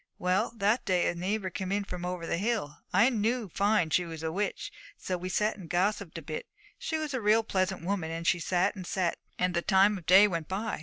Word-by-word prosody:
Well, 180 +3 +1
that 215 +3 +1
day 180 -3 +1
a - - -1
neighbour 190 +2 -2
came 190 +1 -4
in 200 +1 0
from 180 -2 -6
over 180 -2 -4
the 170 - -1
hill. 205 -9 -2
I 215 +8 +5
knew 230 0 0
fine 200 -2 +1
she 180 +3 +3
was 165 -2 -7
a 160 - -1
witch; 205 +5 -3 0.3
so 185 - -3
we 180 +1 -5
sat 210 +4 0
and 180 -5 -10
gossiped 190 0 0
a 165 - -7
bit; 155 +1 -5 0.3
she 320 - -2
was 310 -2 -3
a 260 - -1
real 215 +2 +4
pleasant 185 -4 -1
woman, 185 -4 -1
and 165 +1 -5
she 175 - +3
sat 180 +3 +1
and 185 -3 -7
sat, 180 -3 -1 0.2
and 180 0 +1
the 170 - +1
time 195 +2 +4
of 170 - -19
day 195 +3 +8
went 165 -5 -3
by. 210 +4 -3
185 Hz, 240 wpm, -29 LUFS, 175-210 Hz, 0.3 s, day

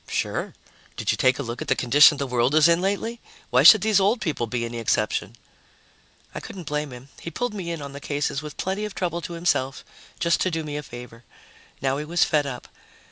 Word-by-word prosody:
"Sure. - - -3 0.4
Did - - 0
you - - 0
take 130 0 +3
a 140 - -3
look 120 -1 -6
at - - -5
the - - +2
condition 145 +4 +6
the 140 - -2
world 125 +2 +1
is 155 +1 +6
in 170 +1 +3
lately? 205 +5 -2 0.3
Why 125 +1 +5
should 185 +8 +9
these 215 -1 +3
old 205 +5 +2
people 145 - -2
be 120 +1 -2
any 115 0 -5
exception?" 110 0 -1 1.0
I - - -5
couldn't 180 -3 -9
blame 150 -1 -3
him. 125 +2 -11
He'd 170 - -8
pulled 245 -2 -2
me 185 -5 -5
in 165 -3 -4
on 140 -1 -8
the 140 - -7
cases 145 0 -2
with 150 -1 -9
plenty 190 +3 -2
of 210 -2 -5
trouble 175 -2 -2
to 170 - -7
himself, 145 -6 -1 0.3
just 170 0 +1
to 185 - +2
do 165 -2 -3
me 150 -1 -6
a 150 - -3
favor. 120 -3 -11 0.6
Now 135 0 +1
he 150 - -5
was 170 +2 +2
fed 150 -2 +1
up. 125 -3 -7
150 Hz, 230 wpm, -24 LUFS, 130-175 Hz, 1.0 s, should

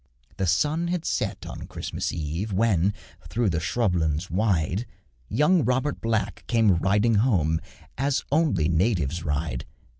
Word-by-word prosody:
The 95 - 0
sun 150 - +1
had 175 -1 -2
set - - -2
on - - -7
Christmas - - -4
Eve, 85 +6 -3
When, 100 -2 +2 0.4
through 110 +2 +1
the 85 0 -1
scrub 110 +3 +1
lands 80 +1 -1
wide, 95 +1 0 0.4
Young 160 +2 +3
Robert 130 +4 0
Black 110 -3 -1
came 110 -6 +4
riding 105 +6 +2
home 80 - +2 0.4
As 135 -2 +1
only 145 - +2
natives 85 - +1
ride. 75 -4 -2
100 Hz, 140 wpm, -25 LUFS, 85-120 Hz, 0.4 s, came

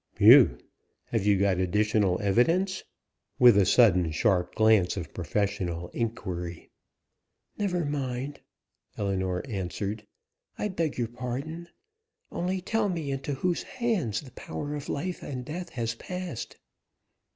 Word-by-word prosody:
"Whew! - - +8 0.5
Have 110 -3 0
you 100 -1 +5
got 95 -1 +2
additional 100 0 +2
evidence?" 165 - +2 0.5
with 125 -3 +7
a 100 -2 +4
sudden 90 -8 +5
sharp 90 +3 +1
glance 110 -4 +4
of 90 - -6
professional 90 -1 -2
inquiry. 90 -7 -4 0.9
"Never 180 -5 0
mind," 140 -1 -3 0.6
Ellinor 95 -3 -1
answered. 100 0 -4 0.5
"I 210 - -1
beg 165 -5 -2
your 120 -2 0
pardon... 135 +8 -5 0.6
only 185 +2 -2
tell 215 +2 0
me 160 -6 -3
into 135 +1 -3
whose 175 +5 0
hands 220 - -1
the 135 -4 -13
power 145 +3 -6
of 145 -1 -6
life 180 +5 -3
and 125 -3 -6
death 175 +4 -5
has 115 -1 -1
passed." 180 +1 -6
120 Hz, 125 wpm, -28 LUFS, 100-160 Hz, 0.9 s, Whew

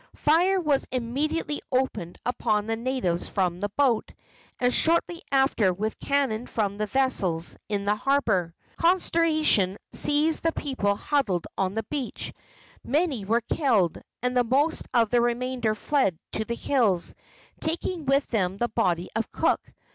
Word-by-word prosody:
Fire 355 +6 +3
was 295 -6 +1
immediately 290 +5 -2
opened 220 -9 -1
upon 215 -4 0
the 225 +1 -1
natives 230 -8 -1
from 180 -2 0
the 205 +1 -2
boat, 245 0 +1 0.5
and 245 0 +2
shortly 335 +1 +3
after 265 -8 +3
with 215 +4 -3
cannon 265 -5 0
from 205 -2 -2
the 215 - 0
vessels 195 -10 0
in 200 -1 -1
the 205 - +3
harbor. 210 -9 +1 0.2
Consternation 320 - +2 0.2
seized 300 +2 +2
the 330 0 +1
people 230 -8 -1
huddled 205 - 0
on 190 +1 -1
the 225 - -1
beach. 280 -5 -5 0.5
Many 285 - 0
were 230 +4 +2
killed, 220 - +1 0.2
and 250 0 0
the 250 - +4
most 280 +7 +1
of 230 -4 +2
the 240 -1 +4
remainder 240 -2 0
fled 215 - +1
to 220 - -2
the 235 - -3
hills, 225 -11 +1 0.5
taking 325 0 -3
with 275 +1 +3
them 190 -4 0
the 240 +3 0
body 180 -6 0
of 225 -1 -2
Cook. - - +1
240 Hz, 145 wpm, -26 LUFS, 205-285 Hz, 0.5 s, the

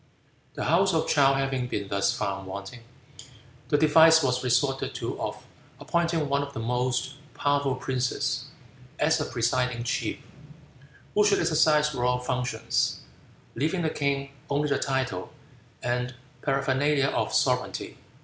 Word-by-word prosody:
The - - -3
House 185 +3 +3
of 160 - +1
Chow 135 -2 +4
having 135 -2 -1
been 100 -4 -3
thus 100 0 +1
found 95 -1 -3
wanting, 100 +5 -7 0.9
the 145 - +2
device 160 +1 +6
was 125 -1 0
resorted 130 +2 +1
to - - -4
of - - -5 0.3
appointing 170 -3 0
one 140 +1 +1
of 140 0 -6
the 130 - -5
most 125 +2 -1 0.2
powerful 140 -2 +1
princes 130 -2 -2 0.5
as - - +2
a - - -1
presiding 120 0 0
chief, 120 - -2 1.0
who 210 - +4
should 205 -1 +4
exercise 150 -1 +3
royal 125 -1 +1
functions, 125 0 -1 0.5
leaving 160 +7 -1
the 160 - 0
king 140 -1 -1 0.2
only 145 +1 +1
the 140 -1 +1
title 130 -1 -2 0.5
and 125 +1 -1 0.3
paraphernalia 140 +1 +1
of - - -1
sovereignity. - - 0
135 Hz, 135 wpm, -27 LUFS, 125-150 Hz, 1.0 s, device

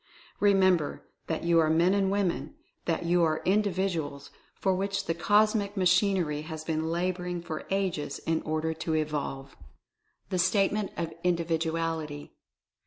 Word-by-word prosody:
Remember 190 -6 +3 0.2
that 160 0 -2
you 170 0 +4
are 160 -1 +3
Men 170 +4 +4
and 195 -1 +2
Women 200 +7 -1
— - - -44
that 170 0 -1
you 175 +1 +3
are 160 -1 +1
Individuals 185 -7 0 0.2
for 190 - +1
which 195 +1 -1
the 165 - 0
cosmic 205 +3 +2
machinery 180 -4 +2
has 155 0 -7
been 160 0 -1
laboring 180 +1 -2
for 160 -2 -6
ages 185 -8 -1
in 165 0 +1
order 155 +1 -1
to 160 0 -2
evolve. 145 -3 -3 0.8
THE 185 - 0
STATEMENT 195 +2 +2
OF 165 -1 -3
INDIVIDUALITY. 165 -3 -1
170 Hz, 140 wpm, -28 LUFS, 160-190 Hz, 0.8 s, you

